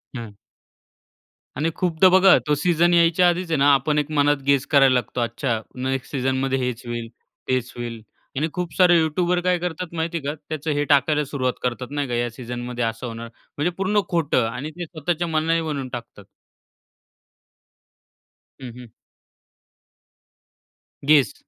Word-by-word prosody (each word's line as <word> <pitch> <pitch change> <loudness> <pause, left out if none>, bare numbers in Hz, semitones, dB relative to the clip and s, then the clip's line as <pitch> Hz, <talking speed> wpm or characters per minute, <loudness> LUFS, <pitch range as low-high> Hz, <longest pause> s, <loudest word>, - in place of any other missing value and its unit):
हं. 115 -4 -8 1.2
आणि 150 +5 0
खूपदा 180 +1 +3
बघा 190 -1 +6
तो 150 - +3
सीझन 175 +3 +2
यायच्या 170 +1 +4
आधीच 175 0 -2
आहे 160 - +2
ना 140 +1 +5
आपण 150 +2 +1
एक 150 +1 -3
मनात 145 -1 +3
गेस 140 -1 +3
करायला 135 -3 +6
लागतो. 125 0 -1
अच्छा 120 0 -2 0.2
नेक्स्ट 130 -1 -3
सीझनमध्ये 135 0 0
हेच 125 -2 -3
होईल, 120 -1 -4 0.4
तेच 130 -1 -1
होईल 120 -2 -6 0.4
आणि 155 - +1
खूप 180 -2 -4
सारे 180 -2 +6
युटूबर 175 +3 +1
काय 180 0 +2
करतात 175 0 -4
माहिती 165 +1 -2
आहे 150 - -7
का 145 - -1 0.2
त्याचं 155 0 -3
हे 145 0 0
टाकायला 145 +2 +3
सुरुवात 130 -2 -1
करतात 125 0 -2
नाही 145 -1 -2
का, 125 - -4
या 120 0 0
सीझनमध्ये 120 +1 -5
असं 115 +2 -3
होणार. 115 0 -7 0.3
म्हणजे 155 +5 0
पूर्ण 200 +2 +1
खोटं 155 -8 +1
आणि 125 +7 -5
ते 175 +2 -6
स्वतःच्या 170 +1 -3
मनाने 165 +1 +1
बनवून 145 -5 -3
टाकतात. 115 -4 -8 2.4
हं, 125 -2 -7
हं. 125 -1 -11 2.2
गेस, 140 -7 +4
145 Hz, 155 wpm, -22 LUFS, 125-165 Hz, 2.4 s, बघा